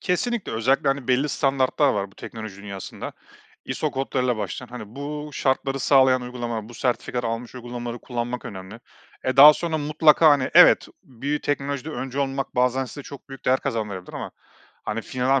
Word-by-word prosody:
Kesinlikle, 225 +4 -1
özellikle, 130 +5 +2
hani, 135 -2 -1
belli 130 +4 +2
standartlar 135 0 +2
var, 100 -1 -2
bu - - -23
teknoloji 110 -4 -8
dünyasında. 100 -2 -7 0.5
ISO - - -2
kodlarıyla 130 -2 -1
başlayan. 105 +4 -5
Hani, 115 -3 -9
bu 150 +1 -5
şartları 135 0 0
sağlayan 130 -1 +4
uygulamalar, 120 -3 -5
bu 120 - -12
sertifikaları 125 0 -1
almış 115 +2 -4
uygulamaları 120 -1 -6
kullanmak 120 0 -4
önemli. 95 +3 -9 0.4
E, 130 +1 -1
daha 150 +2 +11
sonra 160 0 -2
mutlaka, 155 +1 +5
hani, 140 -3 +2
evet, - - +7 0.2
bir 140 +4 -4
teknolojide 140 +1 -2
öncü 135 -2 -5
olmak, 135 0 -2
bazen 125 +1 +2
size 145 +3 -9
çok 140 0 -11
büyük 135 -2 -11
değer 130 +1 +3
kazandırabilir 105 -5 -4
ama - - -6 0.5
hani, 110 +1 -3
finan 130 +2 -2
aaa, 135 0 +4
130 Hz, 170 wpm, -24 LUFS, 120-140 Hz, 0.5 s, daha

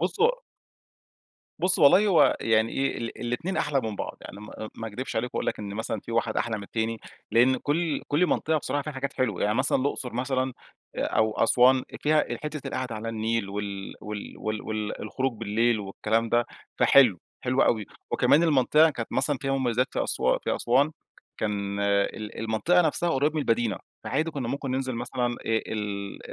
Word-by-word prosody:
بُص، - - -2
هو - - +3 1.2
بُص، 185 +1 +3
والله 180 +8 +6
هو 185 -5 +5
يعني 110 0 +2
إيه 135 0 -1
ال 115 -1 -6
الاتنين 140 +11 -2
أحلى 145 -3 +1
من 110 -3 -4
بعض. - - -5
يعني 100 - -10
م 110 +1 -8
ما 115 - -6
أكدبش 120 +3 -5
عليك 125 +2 -2
وأقول - - -2
لك - - -1
إن 100 -1 -6
مثلًا 110 +1 -3
في - - -8
واحد 115 - 0
أحلى 115 -2 0
من 100 - -7
التاني. 110 +2 -3 0.3
لأن 125 +3 +4
كل 155 +3 -1
كل 155 +5 +3
منطقة 160 -2 +1
بصراحة 145 +1 -2
فيها 150 +1 -5
حاجات 135 +1 -3
حلوة. 110 -8 -1
يعني 105 +1 +2
مثلًا 130 +3 +2
الأقصر 130 -2 -2
مثلًا، 130 +1 -1 0.4
آآ، - - -1
أو 110 0 +1
أسوان 130 +3 +4 0.2
فيها 155 0 +3 0.2
حتة 150 -1 -5
القعدة 130 -3 -3
على 110 +1 -5
النيل 110 -1 -1
وال 100 -1 -5
وال 105 -1 -6
وال 110 0 -3
وال 110 -1 -4
الخروج 130 +5 -2
بالليل 115 +1 +1
والكلام 110 +3 -1
ده، 120 +1 +2 0.3
فحلو، 125 -10 +6 0.2
حلو 130 +1 +2
أوي، 110 -3 +2 0.3
وكمان 155 +4 +4
المنطقة 155 +1 +4
كانت 115 -6 -5
مثلًا 145 -2 +1
فيها 135 0 -1
مميزات 125 -2 +1
في - - 0
أسوا 65 0 +1
في - - -2
أسوان، 135 +5 +2 0.5
كان 100 -1 -2
ال 100 +1 0
المنطقة 115 +11 +2
نفسها 170 +2 0
قريب 145 +1 +1
من 155 - 0
المدينة، 115 -6 0 0.3
فعادي 155 +5 0
كنا 135 -5 -4
ممكن 135 0 -3
ننزل 130 -1 -1
مثلًا 120 +1 -2
آآ، - - +1 0.2
ال 105 -3 -2
120 Hz, 185 wpm, -26 LUFS, 110-140 Hz, 1.2 s, والله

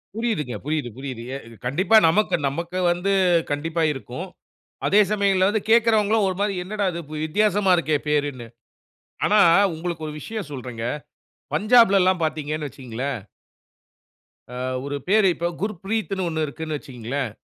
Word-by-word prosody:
புரியுதுங்க. 215 - -2
புரியுது. 150 -4 -1
புரியுது, 130 -3 -6 0.3
இது 115 - -13
கண்டிப்பா, 185 - +4
நமக்கு 210 +6 +2
நமக்கு 170 +6 -3
வந்து 180 +3 -1 0.4
கண்டிப்பா 160 +3 -1
இருக்கும். 135 +6 -7 0.6
அதே 205 +2 +5
சமயங்கள 195 -2 +3
வந்து 215 0 0
கேக்குறவங்களும் 220 -2 +4
ஒரு 185 - -1
மாரி 205 0 +1
என்னடா 205 +2 -2
இது 170 - -4 0.2
வித்தியாசமா 205 +3 +2
இருக்கே 155 -3 +1
பேருன்னு. 145 -5 -1 0.8
ஆனா, 210 - +4 0.4
உங்களுக்கு 165 0 -4
ஒரு 150 - -6
விஷயம் 215 -1 -6
சொல்றேங்க, 125 -4 -6 0.7
பஞ்சாப்ல 215 +1 +5
எல்லாம் 185 -1 +2
பார்த்தீங்கன்னு 155 -1 -2
வச்சுக்கங்களேன். 130 0 -5 1.3
அ - - -7 0.3
ஒரு 140 0 -3
பேரு, 205 +1 +4
இப்ப 170 +1 -1
குர்ப்ரீத்ன்னு 200 -1 -2
ஒண்ணு 160 -1 -1
இருக்குன்னு 155 +1 -4
வச்சுக்கங்களேன், 130 0 -4
170 Hz, 130 wpm, -23 LUFS, 145-205 Hz, 1.3 s, அதே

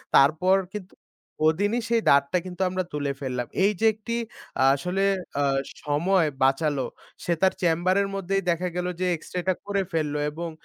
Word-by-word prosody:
তারপর 160 +7 +5 0.2
কিন্তু 200 -3 -7 0.6
ওদিনই 205 +8 0
সেই 230 -1 +3
দাঁতটা 140 +5 +4
কিন্তু 185 0 -7
আমরা 185 0 -1
তুলে 145 -1 -1
ফেললাম। 125 -3 -3 0.2
এই 200 - +5
যে 225 - +2
একটি 225 +2 -5 0.6
আসলে 180 +7 -1 0.4
আ - - +3 0.4
সময় 165 +4 +2 0.2
বাঁচালো 135 0 +2 0.4
সে 175 - +2
তার 190 0 +4
চেম্বারের 180 +4 +2
মধ্যেই 195 0 -1
দেখা 175 +2 +1
গেল 180 0 -1
যে 185 - 0
এক্সরে 180 +3 -5
টা 185 - +4
করে 200 -1 0
ফেলল, 155 -3 -1 0.2
এবং 170 +2 -5
180 Hz, 160 wpm, -25 LUFS, 150-195 Hz, 0.6 s, তারপর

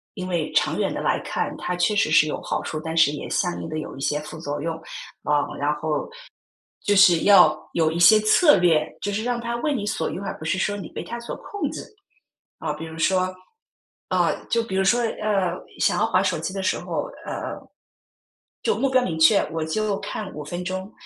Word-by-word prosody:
因 185 -1 -5
为 170 -4 -1
长 - - +2
远 - - 0
地 - - -4
来 - - +1
看， - - -3
它 180 - -3
确 175 +4 +1
实 200 - +2
是 155 -1 +6
有 150 - -3
好 - - -2
处， 155 - -4
但 160 0 -4
是 160 -3 +5
也 150 - -6
相 175 -3 -1
应 - - -6
地 155 0 -3
有 - - -7
一 135 - -9
些 145 +2 0
副 155 +1 -9
作 145 -2 -4
用。 165 +1 -2 0.5
啊， 150 -1 +2
然 145 +1 +1
后 150 0 -2 0.8
就 205 - +3
是 180 -4 +7
要 180 -6 +7 0.2
有 160 -2 +2
一 165 - -3
些 215 +6 +8
策 290 - +5
略， 165 -4 +3 0.2
就 205 - -2
是 215 +2 -2
让 245 0 -1
它 235 0 -3
为 295 +5 0
你 220 -7 -2
所 210 - -1
用， 190 - -5
而 - - -4
不 - - -10
是 160 +4 0
说 205 +2 0
你 195 -5 -7
被 - - -6
它 235 - -6
所 235 - -6
控 410 - -4
制。 - - -6 0.8
啊， 155 - -2
比 150 +2 -8
如 160 0 -9
说 185 +2 +1 0.8
啊， - - +2 0.2
就 230 0 +2
比 195 -4 -6
如 190 - +2
说， 240 +5 +3
呃， 210 -5 0 0.3
想 - - +2
要 - - +3
滑 - - +2
手 - - 0
机 - - -4
的 195 - -3
时 185 - 0
候 - - -3 0.2
呃， - - -4 1.1
就 455 - +2
目 275 - +1
标 260 -1 +4
明 165 -9 -2
确， 180 +6 +6
我 160 -1 -2
就 205 +5 -1
看 210 -3 -5
5 150 - -6
分 175 +4 -5
钟， 190 +3 -5
185 Hz, 240 characters per minute, -23 LUFS, 160-210 Hz, 1.1 s, 些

